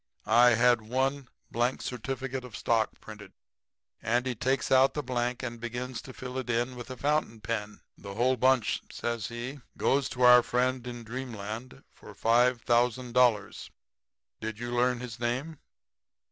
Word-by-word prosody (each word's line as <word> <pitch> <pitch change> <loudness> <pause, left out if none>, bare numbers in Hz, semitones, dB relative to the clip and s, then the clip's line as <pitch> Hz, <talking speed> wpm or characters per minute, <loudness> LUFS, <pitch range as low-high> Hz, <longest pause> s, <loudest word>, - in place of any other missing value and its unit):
I 120 0 +6
had 120 0 +4
one 130 +4 -1 0.2
blank 120 +2 0
certificate 130 +1 -4
of 125 -4 -8
stock 115 -2 0
printed.' 105 -3 -11 0.7
"Andy 120 +3 0
takes 130 +3 -1
out 135 +1 +5
the 150 - -2
blank 125 0 -2
and 120 -2 -5
begins 120 +1 -5
to 130 - -10
fill 130 0 -6
it 125 -2 -6
in 120 +2 0
with 120 0 -8
a 130 - -7
fountain 145 -6 0
pen. 105 -1 -4 0.2
"'The 100 -1 -8
whole 125 +4 +2
bunch,' 130 -1 +2
says 115 -3 -3
he, 120 +4 -6 0.2
'goes 135 0 +1
to 125 - -2
our 125 0 +9
friend 125 +1 0
in 120 -1 -6
dreamland 115 - -7
for - - -14
$5,000. 120 -1 +2 0.7
Did 110 -1 -5
you 120 +1 -5
learn 125 0 +1
his 120 -2 -7
name?' 130 +7 -2
125 Hz, 150 wpm, -29 LUFS, 115-130 Hz, 0.7 s, our